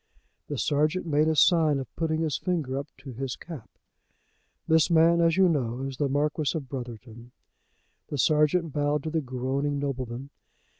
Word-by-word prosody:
The 145 Hz, -, -4 dB
sergeant 150 Hz, +7 st, +1 dB
made 155 Hz, -1 st, +2 dB
a 160 Hz, -, +2 dB
sign 160 Hz, -2 st, +4 dB
of 135 Hz, -3 st, -7 dB
putting 160 Hz, -1 st, -1 dB
his 155 Hz, -5 st, 0 dB
finger 160 Hz, -8 st, -2 dB
up 140 Hz, -, -6 dB
to 135 Hz, -2 st, -9 dB
his 130 Hz, +2 st, -4 dB
cap. 160 Hz, -9 st, -10 dB, 1.0 s
"This, 160 Hz, +1 st, +4 dB
man, 170 Hz, 0 st, +5 dB
as 165 Hz, 0 st, +3 dB
you 190 Hz, -1 st, +6 dB
know, 130 Hz, -7 st, -1 dB
is 135 Hz, -1 st, -5 dB
the 145 Hz, -2 st, 0 dB
Marquis 150 Hz, +3 st, 0 dB
of 140 Hz, -4 st, -6 dB
Brotherton." 120 Hz, -2 st, -8 dB, 0.8 s
The 145 Hz, -, -4 dB
sergeant 150 Hz, +3 st, +2 dB
bowed 145 Hz, 0 st, 0 dB
to 155 Hz, -, -3 dB
the 160 Hz, 0 st, 0 dB
groaning 135 Hz, +2 st, -2 dB
nobleman. 135 Hz, -1 st, -4 dB
145 Hz, 165 wpm, -27 LUFS, 135-160 Hz, 1.0 s, you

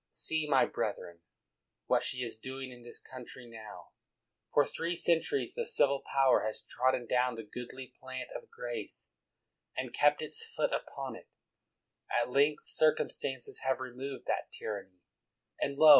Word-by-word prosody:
See, 155 Hz, -1 st, +1 dB
my 135 Hz, -2 st, +6 dB
brethren, 85 Hz, -1 st, -3 dB, 0.7 s
what -, -, +3 dB
she 125 Hz, -1 st, +2 dB
is 115 Hz, -, -1 dB
doing 130 Hz, +3 st, -5 dB
in 120 Hz, -1 st, -11 dB
this 120 Hz, 0 st, 0 dB
country 130 Hz, -1 st, -9 dB
now: 110 Hz, -2 st, -10 dB, 0.6 s
for 145 Hz, -, +5 dB
three 170 Hz, +4 st, -1 dB
cen 170 Hz, -1 st, +4 dB
turies 420 Hz, -, -1 dB
the 480 Hz, -, 0 dB
civil 140 Hz, -, +3 dB
power 135 Hz, -1 st, +5 dB
has 110 Hz, 0 st, 0 dB
trodden 130 Hz, -1 st, +2 dB
down 125 Hz, +1 st, +2 dB
the 115 Hz, -, -6 dB
goodly 125 Hz, +4 st, -7 dB
plant -, -, -5 dB
of -, -, -7 dB
grace, 470 Hz, 0 st, -3 dB, 0.7 s
and -, -, -2 dB
kept -, -, +4 dB
its 455 Hz, -, -3 dB
foot -, -, +2 dB
upon -, -, -3 dB
it; 475 Hz, -, -13 dB, 0.8 s
at 120 Hz, +1 st, +1 dB
length 145 Hz, +3 st, +4 dB
circumstances 135 Hz, -4 st, +2 dB
have 130 Hz, -1 st, +1 dB
removed 130 Hz, +1 st, -5 dB
that -, -, -1 dB
tyr 105 Hz, -2 st, -3 dB
anny, 90 Hz, -2 st, -25 dB, 0.6 s
and 140 Hz, 0 st, 0 dB
lo! 155 Hz, +1 st, +9 dB
130 Hz, 160 wpm, -33 LUFS, 120-150 Hz, 0.8 s, lo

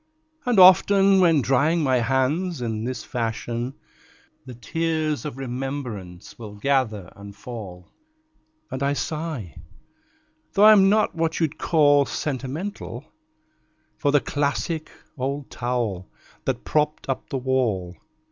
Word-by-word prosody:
And 245 Hz, -3 st, +2 dB
often, 195 Hz, +1 st, +7 dB
when 165 Hz, -6 st, +4 dB
drying 150 Hz, +6 st, +2 dB
my 130 Hz, -2 st, +2 dB
hands 135 Hz, +8 st, 0 dB
in 110 Hz, -2 st, -3 dB
this 130 Hz, 0 st, -4 dB
fashion, 120 Hz, +1 st, -3 dB, 0.7 s
The 125 Hz, -, -8 dB
tears 155 Hz, +5 st, -2 dB
of 145 Hz, -4 st, -5 dB
remembrance 125 Hz, -9 st, -6 dB
will 105 Hz, -3 st, -9 dB
gather 110 Hz, -5 st, -1 dB
and 100 Hz, 0 st, -11 dB
fall, 100 Hz, -6 st, -9 dB, 0.8 s
And 130 Hz, -, -4 dB
I 140 Hz, +1 st, +1 dB
sigh 150 Hz, -, -4 dB, 1.0 s
(though 205 Hz, +1 st, +5 dB
I'm 205 Hz, -3 st, +7 dB
not 215 Hz, +1 st, +2 dB
what 165 Hz, -1 st, -1 dB
you'd 160 Hz, -3 st, -1 dB
call 145 Hz, -3 st, +4 dB
sentimental) 145 Hz, +8 st, -5 dB, 0.9 s
For 145 Hz, -, +1 dB
the 145 Hz, -1 st, +4 dB
classic 150 Hz, +2 st, -2 dB, 0.3 s
old 140 Hz, +2 st, -3 dB
towel 120 Hz, -7 st, -3 dB, 0.4 s
that -, -, -2 dB
propped 150 Hz, 0 st, 0 dB
up 135 Hz, -1 st, -3 dB
the 135 Hz, -, -2 dB
wall. 120 Hz, -9 st, -1 dB
135 Hz, 120 wpm, -24 LUFS, 120-160 Hz, 1.0 s, often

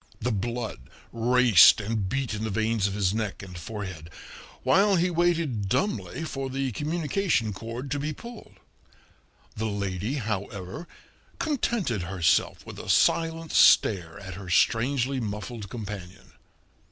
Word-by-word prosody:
The 125 Hz, -, -1 dB
blood 115 Hz, -, -3 dB, 0.3 s
raced 120 Hz, -5 st, +6 dB
and 105 Hz, -2 st, -2 dB
beat 135 Hz, 0 st, -2 dB
in 105 Hz, +1 st, -4 dB
the 110 Hz, -, -2 dB
veins 110 Hz, 0 st, +1 dB
of 100 Hz, -, -4 dB
his 100 Hz, -2 st, +1 dB
neck 110 Hz, -3 st, -3 dB
and 90 Hz, -2 st, -10 dB
forehead, 95 Hz, -3 st, -7 dB, 0.5 s
while 200 Hz, +2 st, +4 dB
he 180 Hz, +1 st, +2 dB
waited 165 Hz, -, 0 dB
dumbly 165 Hz, -, -1 dB
for 135 Hz, -3 st, -4 dB
the 135 Hz, 0 st, -2 dB
communication 155 Hz, -, -1 dB
cord 115 Hz, +6 st, -7 dB
to 145 Hz, -, -1 dB
be 150 Hz, +2 st, -2 dB
pulled. 235 Hz, +9 st, -11 dB, 1.0 s
The 110 Hz, +1 st, -2 dB
lady, 100 Hz, +3 st, -2 dB
however, 100 Hz, -, -4 dB, 0.5 s
contented 235 Hz, -, -1 dB
herself 85 Hz, -2 st, +1 dB
with -, -, -9 dB
a -, -, -8 dB
silent 165 Hz, -1 st, +2 dB
stare 90 Hz, -4 st, +4 dB
at 95 Hz, -3 st, -8 dB
her 95 Hz, 0 st, -8 dB
strangely 130 Hz, +7 st, +2 dB
muffled 105 Hz, -1 st, -5 dB
companion. 100 Hz, -4 st, -8 dB
115 Hz, 135 wpm, -26 LUFS, 100-140 Hz, 1.0 s, raced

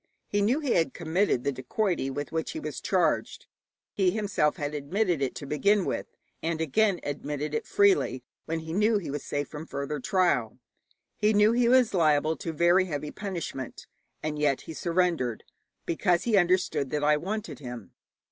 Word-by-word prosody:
He 205 Hz, -, 0 dB
knew 235 Hz, +8 st, +2 dB
he 280 Hz, -5 st, -1 dB
had 165 Hz, -6 st, +2 dB
committed 170 Hz, -5 st, +1 dB
the 140 Hz, -, +1 dB
dacoity 135 Hz, -, -1 dB
with 145 Hz, +2 st, -5 dB
which 160 Hz, -, -2 dB
he 315 Hz, -, -4 dB
was -, -, -5 dB
charged: -, -, 0 dB, 0.5 s
he 190 Hz, -2 st, +2 dB
himself 190 Hz, -7 st, +1 dB
had 145 Hz, 0 st, -4 dB
admitted 170 Hz, +3 st, 0 dB
it 135 Hz, -, -1 dB
to 145 Hz, -, -6 dB
begin 195 Hz, +7 st, +2 dB
with, -, -, -2 dB, 0.3 s
and 165 Hz, 0 st, -2 dB
again 185 Hz, +5 st, +2 dB
admitted 145 Hz, +1 st, -4 dB
it 150 Hz, -, -2 dB
freely 195 Hz, -10 st, +3 dB, 0.2 s
when 160 Hz, 0 st, -2 dB
he 160 Hz, 0 st, -6 dB
knew 210 Hz, +3 st, +3 dB
he 175 Hz, -8 st, -4 dB
was 145 Hz, 0 st, -4 dB
safe 145 Hz, 0 st, -2 dB
from 155 Hz, +1 st, -8 dB
further 140 Hz, +1 st, -4 dB
trial. 135 Hz, -, +1 dB, 0.6 s
He 210 Hz, +1 st, +3 dB
knew 210 Hz, +1 st, +5 dB
he 235 Hz, 0 st, +3 dB
was 250 Hz, -3 st, +4 dB
liable 155 Hz, -3 st, +3 dB
to 165 Hz, -, -4 dB
very 175 Hz, +4 st, +4 dB
heavy 150 Hz, -3 st, -4 dB
punishment, 170 Hz, -, -5 dB, 0.4 s
and 150 Hz, -1 st, -2 dB
yet 145 Hz, -3 st, +2 dB
he 160 Hz, -, -8 dB
surrendered 170 Hz, -9 st, 0 dB, 0.4 s
because 175 Hz, +1 st, +1 dB
he 230 Hz, -3 st, +2 dB
understood 180 Hz, -6 st, +2 dB
that 150 Hz, +1 st, -2 dB
I 150 Hz, 0 st, +5 dB
wanted 210 Hz, +8 st, -4 dB
him. 120 Hz, -6 st, -8 dB
165 Hz, 175 wpm, -27 LUFS, 145-200 Hz, 0.6 s, knew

